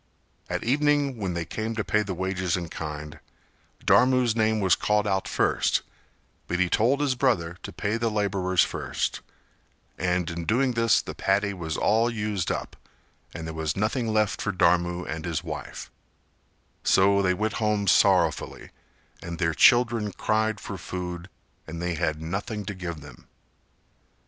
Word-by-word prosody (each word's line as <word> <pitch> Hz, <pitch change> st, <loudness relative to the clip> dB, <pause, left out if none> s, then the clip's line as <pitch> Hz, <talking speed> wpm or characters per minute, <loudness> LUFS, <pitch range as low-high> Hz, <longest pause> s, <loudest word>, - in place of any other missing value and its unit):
At -, -, -2 dB
evening 145 Hz, +1 st, +2 dB
when 95 Hz, -5 st, -3 dB
they 85 Hz, -1 st, -2 dB
came 110 Hz, +5 st, -4 dB
to 110 Hz, -, -1 dB
pay 105 Hz, -, +1 dB
the 100 Hz, -3 st, -4 dB
wages 95 Hz, -1 st, -1 dB
in 85 Hz, -2 st, -5 dB
kind, 75 Hz, -2 st, -6 dB, 0.7 s
Dharmu's 125 Hz, -3 st, +4 dB
name 110 Hz, -1 st, +2 dB
was 95 Hz, -3 st, +3 dB
called 105 Hz, 0 st, +1 dB
out 95 Hz, -2 st, 0 dB
first, -, -, +1 dB, 0.6 s
but 90 Hz, -, -1 dB
he 90 Hz, -1 st, +2 dB
told 125 Hz, +6 st, +3 dB
his 140 Hz, -3 st, +2 dB
brother 95 Hz, -10 st, 0 dB
to -, -, -7 dB
pay 105 Hz, +2 st, -2 dB
the 115 Hz, 0 st, 0 dB
labourers 100 Hz, -4 st, +1 dB
first, -, -, -3 dB, 0.8 s
and 90 Hz, -1 st, 0 dB
in 85 Hz, 0 st, -5 dB
doing 125 Hz, +6 st, +2 dB
this 115 Hz, -1 st, +3 dB
the -, -, -6 dB
paddy 100 Hz, +1 st, +1 dB
was 80 Hz, -4 st, -4 dB
all 115 Hz, +3 st, +2 dB
used 105 Hz, -5 st, -2 dB
up -, -, -4 dB, 0.6 s
and 85 Hz, -, -5 dB
there 80 Hz, -, -5 dB
was 80 Hz, 0 st, -2 dB
nothing 115 Hz, +4 st, 0 dB
left 110 Hz, -1 st, +1 dB
for 100 Hz, -, -1 dB
Dharmu 90 Hz, -1 st, +2 dB
and 80 Hz, 0 st, -5 dB
his 85 Hz, -3 st, -2 dB
wife; -, -, -7 dB, 0.9 s
so 100 Hz, +1 st, +4 dB
they 90 Hz, -1 st, +2 dB
went 110 Hz, +3 st, -1 dB
home 105 Hz, -1 st, +1 dB
sorrowfully 90 Hz, -4 st, +2 dB, 0.5 s
and 85 Hz, 0 st, -6 dB
their 80 Hz, -2 st, +1 dB
children 115 Hz, -, +4 dB
cried 110 Hz, -1 st, 0 dB
for 100 Hz, -2 st, -7 dB
food 90 Hz, +1 st, -6 dB, 0.4 s
and 85 Hz, +1 st, -6 dB
they 90 Hz, 0 st, -1 dB
had 80 Hz, -2 st, -1 dB
nothing 95 Hz, +6 st, -4 dB
to 100 Hz, -, -4 dB
give 85 Hz, -4 st, -6 dB
them. 70 Hz, -4 st, -14 dB
95 Hz, 160 wpm, -26 LUFS, 85-110 Hz, 0.9 s, Dharmu's